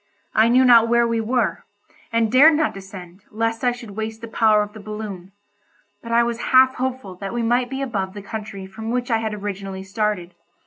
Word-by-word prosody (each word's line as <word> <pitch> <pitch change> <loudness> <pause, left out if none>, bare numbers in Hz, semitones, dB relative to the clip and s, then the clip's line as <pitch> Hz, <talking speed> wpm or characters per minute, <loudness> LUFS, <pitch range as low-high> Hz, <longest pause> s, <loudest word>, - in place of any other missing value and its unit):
I 220 +1 +4
knew 255 +2 +4
not 235 -2 +7
where 235 0 +3
we 230 -1 0
were, 245 +3 -1 0.5
and 230 -1 +1
dared 295 +5 +7
not 310 0 +1
descend, 190 -1 -11
lest 225 +2 -2
I 245 - +3
should 240 -3 -9
waste 220 +2 -5
the 230 - -7
power 215 -1 +3
of 210 0 -9
the 220 - -10
balloon, 205 -3 -7 0.7
but 230 - -8
I 235 +1 +4
was 235 0 -2
half 260 0 +6
hopeful 255 -6 -3
that 195 +4 -6
we 240 - -1
might 245 +2 +1
be 270 +1 -3
above 200 -6 -3
the 205 - -8
country 205 -2 -7
from 220 +4 -7
which 245 +1 -2
I 225 - +3
had 220 -1 -3
originally 195 -2 -6
started. 195 -3 -2
225 Hz, 210 wpm, -21 LUFS, 200-240 Hz, 0.7 s, not